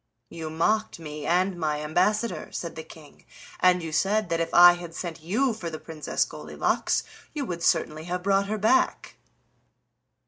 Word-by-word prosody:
"You 160 -1 -6
mocked 215 +8 0
me 150 -2 -7
and 180 +2 +2
my 150 -2 -1
ambassador," 210 +9 0
said 170 -1 -5
the 160 - -5
King, 155 -2 -15 0.4
"and 180 -1 +4
you 160 - -5
said 205 +6 +1
that 165 - 0
if 165 - -1
I 175 0 +9
had 175 -1 -8
sent 170 -3 -6
you 225 +10 +1
for 185 -6 -5
the 160 - -6
Princess 155 -1 -2
Goldilocks - - -1 0.3
you 290 -2 -2
would 170 -6 -5
certainly 155 -2 +1
have 180 +1 -3
brought 195 0 +2
her 215 +1 -2
back." 220 +5 +1
175 Hz, 170 wpm, -26 LUFS, 160-200 Hz, 0.4 s, I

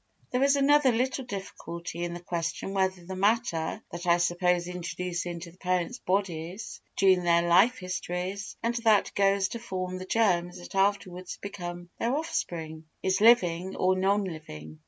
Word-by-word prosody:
There 250 - +1
is 280 +1 +5
another 280 -1 +5
little 255 +3 -1
difficulty 175 -5 -6
in 175 0 -3
the - - -6
question 170 +2 -3
whether 190 -2 0
the 190 +1 -6
matter 205 -2 0
that 175 +1 -6
I 170 0 +5
suppose 175 0 +1
introduced 180 0 -4
into 170 0 -6
the 180 - -23
parents' 180 -2 -1
bodies 185 0 -2 0.2
during 190 -2 +5
their 170 -1 +3
life 190 +9 +5
histories, 185 +1 -4
and 235 +1 +1
that 220 -3 +3
goes 195 -1 +2
to 235 - -5
form 185 -4 -4
the 185 - -6
germs 180 -5 +1
that 175 - -11
afterwards 195 -2 0
become 175 -3 -7
their 240 +3 +1
offspring, 165 - -4 0.2
is 190 +1 +1
living 190 -6 +4
or 185 0 +2
non 195 +2 +2
living. 80 - -8
185 Hz, 160 wpm, -28 LUFS, 175-200 Hz, 0.2 s, is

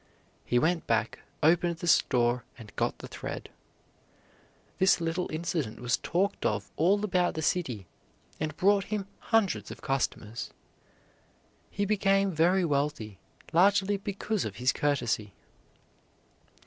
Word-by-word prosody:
He 120 - +1
went 165 +6 +1
back, 115 -1 0 0.2
opened 170 +2 +3
the 165 - -7
store, 120 -5 +3
and 110 -4 -13
got - - -1
the - - -9
thread. - - -6 1.3
This 190 -1 +5
little 170 +2 -2
incident 155 -7 -3
was 120 0 +1
talked 190 +4 -1
of - - -1
all 200 +6 +3
about 180 -3 +1
the 160 - -3
city 125 - -1 0.5
and 155 -1 -3
brought 200 +1 +3
him 210 -2 -3
hundreds 225 -4 +1
of - - -10
customers. 120 -5 -2 1.2
He 200 - -1
became 195 -1 +2
very 175 +3 +3
wealthy, 140 - -1 0.3
largely 200 +3 +4
because 200 +1 -2
of - - -5
his 125 +2 +1
courtesy. 120 -8 -1
165 Hz, 125 wpm, -29 LUFS, 125-195 Hz, 1.3 s, This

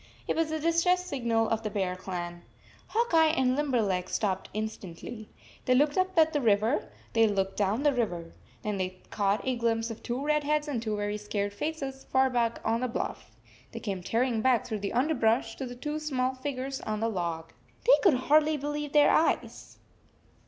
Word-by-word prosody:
It - - 0
was 325 -1 +1
the 315 0 -2
distress 335 +3 +2
signal 235 -8 0
of 225 0 0
the 215 - -3
Bear 190 -3 -1
Clan. 175 -2 -5 0.5
Hawk 465 -2 0
Eye 320 -1 +6
and 255 -1 +3
Limberleg 220 -11 0
stopped 190 -3 -1
instantly. 215 0 -6 0.4
They 255 - +4
looked 290 +2 +3
up 370 0 +1
the 320 -2 +4
river; 220 +3 +2 0.2
they 225 -1 +5
looked 195 -2 -1
down 210 +6 0
the 290 -1 +4
river. 175 -9 -2 0.3
Then 210 -2 -2
they 185 0 -3
caught 200 0 0
a 255 - +1
glimpse 230 -1 0
of 225 - -8
two 255 +3 -3
red 300 0 +2
heads 300 +1 0
and 260 -6 -2
two 215 -2 -2
very 205 0 -2
scared 205 -1 -3
faces, 275 +1 -4
far 265 0 +3
back 235 -2 0
on 230 +2 +1
the 255 - 0
bluff. 235 - -4 0.4
They - - -5
came 195 -4 -4
tearing 230 +4 0
back 250 -1 +3
through 215 - -3
the 200 0 -3
underbrush 235 -4 +1
to 265 - -4
the 245 - -8
two 295 +5 -4
small 260 -4 -1
figures 265 0 -4
on 215 -1 -3
the 225 - +1
log. 170 -6 -3 0.3
They - - +7
could 375 -9 +5
hardly 305 +2 +4
believe 295 0 -4
their 295 -1 +6
eyes. 325 - 0
240 Hz, 190 wpm, -29 LUFS, 210-290 Hz, 0.5 s, They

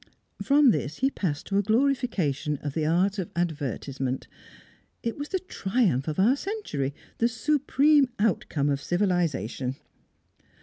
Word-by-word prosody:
From 280 -2 +5
this 155 -6 -2
he 270 +1 +1
passed 155 - -3
to 200 0 +1
a - - +4
glorification 210 - +1
of 145 -2 -3
the 155 0 0
art 190 +5 +2
of 180 - -3
advertisement. 135 - -2 0.8
It 230 - -2
was 290 +1 -6
the 380 - 0
triumph 195 - 0
of 155 - -2
our 230 +8 +5
century, 280 - -3 0.2
the 230 - +4
supreme 285 +3 +3
outcome 165 -8 0
of 140 -1 0
civilisation! 165 - 0
190 Hz, 135 wpm, -26 LUFS, -, 0.8 s, From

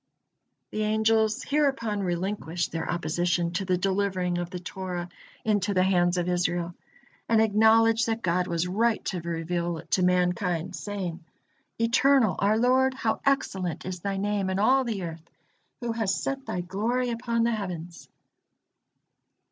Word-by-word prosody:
The 215 - -2
angels 220 +2 +2
hereupon 270 -8 0
relinquished 175 -1 -2
their 165 0 -3
opposition 175 +1 0
to 180 +2 -2
the 180 -1 +1
delivering 185 -2 0
of 175 -1 -3
the 180 - -5
Torah 180 -1 -5 0.4
into 205 -2 +1
the 185 - +4
hands 180 -1 +2
of 175 0 0
Israel, 175 -1 0 0.6
and 225 -1 +4
acknowledged 220 +1 +4
that 225 0 -2
God 180 +1 +1
was 170 +1 -1
right 220 +5 +1
to 180 -3 -2
reveal 170 +1 -2
it 160 - -12
to 185 - +3
mankind, 180 0 +1
saying: 185 -5 -5 0.5
"Eternal, 230 - +3
our 205 +2 +3
Lord, 260 +2 +3
how 230 -4 -1
excellent 190 - 0
is 185 -1 -4
Thy 195 +2 -3
name 200 -1 -1
in 190 - -1
all 260 +6 +4
the 220 -6 -3
earth! 165 -1 -7 0.5
Who 240 -1 -2
hast 225 -4 -1
set 275 0 -3
Thy 180 - -2
glory 230 +7 -1
upon 235 0 -1
the 235 - +2
heavens." 180 -6 -5
190 Hz, 150 wpm, -27 LUFS, 175-225 Hz, 0.6 s, the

